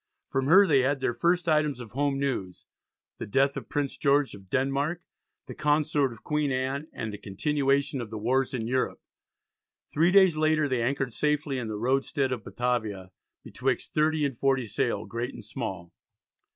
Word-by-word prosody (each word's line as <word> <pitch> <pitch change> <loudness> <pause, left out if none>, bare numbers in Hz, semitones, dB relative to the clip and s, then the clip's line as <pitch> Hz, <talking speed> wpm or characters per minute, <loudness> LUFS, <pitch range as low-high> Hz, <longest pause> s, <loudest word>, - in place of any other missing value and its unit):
From 135 0 0
her 190 +6 +7
they 145 -7 +4
had 135 +2 +1
their 120 - 0
first 175 +8 +1
items 150 -4 +2
of 115 -4 -9
home 140 +3 0
news, 130 -10 -3 0.5
the - - -5
death 135 +6 +2
of - - -7
Prince 145 -2 -2
George 140 -1 +2
of 95 -2 -13
Denmark, 140 - 0 0.4
the - - -8
Consort 150 -2 +1
of 115 -1 -13
Queen 150 -2 0
Anne, 135 +3 -2
and 110 -2 -5
the 105 - -7
continuation 140 +5 0
of 115 - -6
the 110 - -6
wars 130 +5 +1
in 115 -3 -3
Europe. 130 +2 -1 0.9
Three 165 +4 +3
days 190 -4 +6
later 155 -1 +2
they 130 -3 0
anchored 130 0 -1
safely 150 0 0
in 120 - -4
the 110 -1 -4
roadstead 135 +3 0
of 120 -4 -3
Batavia 110 -7 -2 0.3
"betwixt - - -2
30 155 0 +2
and 135 -3 -2
40 135 0 +1
sail, 110 0 -1
great 115 +5 -4
and - - -10
small." 95 -9 -6
135 Hz, 180 wpm, -27 LUFS, 120-150 Hz, 0.9 s, her